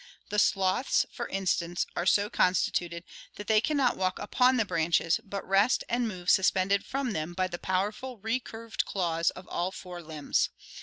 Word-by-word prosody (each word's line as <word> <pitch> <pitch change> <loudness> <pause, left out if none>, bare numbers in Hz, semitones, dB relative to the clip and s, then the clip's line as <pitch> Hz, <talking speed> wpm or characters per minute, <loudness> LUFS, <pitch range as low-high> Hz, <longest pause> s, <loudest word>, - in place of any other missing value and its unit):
The 210 0 +1
sloths 195 +6 +2
(Fig. - - -21
72), - - -18
for 235 - -4
instance, 175 -2 -1
are 175 - -1
so 205 +1 +4
constituted 175 -3 +1 0.3
that 205 - -7
they 215 0 +4
can 295 +5 0
not 260 -3 +2
walk 185 -1 0
upon 250 +5 +2
the 225 - +2
branches 165 -2 +1
but 200 0 -6
rest 195 +6 +3
and 240 0 0
move 180 -4 -7
suspended 190 +1 +3
from 270 -2 -2
them 160 -1 -4
by 185 0 +1
the 175 -1 -5
powerful 210 +7 -2
recurved 225 +1 -3
claws 170 -3 0
of 185 - -10
all 175 +1 -1
four 180 -2 -8
limbs. 155 -3 -1
190 Hz, 185 wpm, -29 LUFS, 175-225 Hz, 0.3 s, so